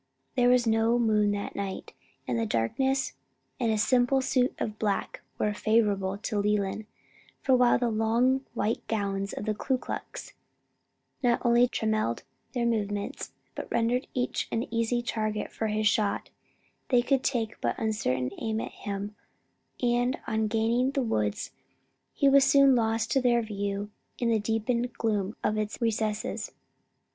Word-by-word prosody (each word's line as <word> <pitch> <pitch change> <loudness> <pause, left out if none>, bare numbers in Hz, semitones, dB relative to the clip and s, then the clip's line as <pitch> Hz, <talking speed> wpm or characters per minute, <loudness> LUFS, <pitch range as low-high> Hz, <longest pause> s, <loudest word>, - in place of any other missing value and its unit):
There 245 -1 +4
was 250 -1 +4
no 225 +1 +3
moon 215 -3 +3
that 200 0 -4
night, 195 -1 -5 0.3
and 230 - 0
the 225 - 0
darkness 265 - 0 0.5
and 235 -3 +1
a 220 - +1
simple 245 +4 +3
suit 260 -1 +1
of 215 -1 -4
black, 205 -2 -1 0.2
were 210 - 0
favorable 205 -3 +1
to 210 0 -2
Leland, 210 0 0 0.6
for 265 - +4
while 250 -1 +5
the 240 -2 0
long 235 +5 +2
white 220 +2 0
gowns 200 -2 -1
of - - -5
the 215 - 0
Ku 260 +5 -1
Klux - - -7 0.9
not 240 -3 +3
only 240 +1 +5
trammelled 215 - -1 0.3
their 240 -1 +1
movements, 205 -3 -2 0.2
but - - -6
rendered 240 +3 +1
each 250 -1 -1
an 230 - 0
easy 230 +1 +1
target 215 -2 -2
for 220 - -2
his 215 0 +1
shot, 205 -1 0 0.6
they 245 -2 +4
could 270 0 +1
take 230 -4 -1
but - - 0
uncertain 130 - -1
aim 220 -1 -1
at - - -4
him, 205 +1 -5 0.7
and 245 +1 +2
on 220 -1 0
gaining 230 +4 +1
the 275 -1 0
woods, 105 - -1 0.6
he 280 - +2
was 275 0 +7
soon 275 0 +6
lost 225 -1 +1
to 270 - +3
their 240 -2 +3
view 205 -1 -3 0.3
in 240 - 0
the 220 - +3
deepened 235 +3 -1
gloom 210 -3 -1
of 215 0 +1
its 210 -1 -3
recesses. 220 -2 -1
225 Hz, 155 wpm, -28 LUFS, 210-245 Hz, 0.9 s, was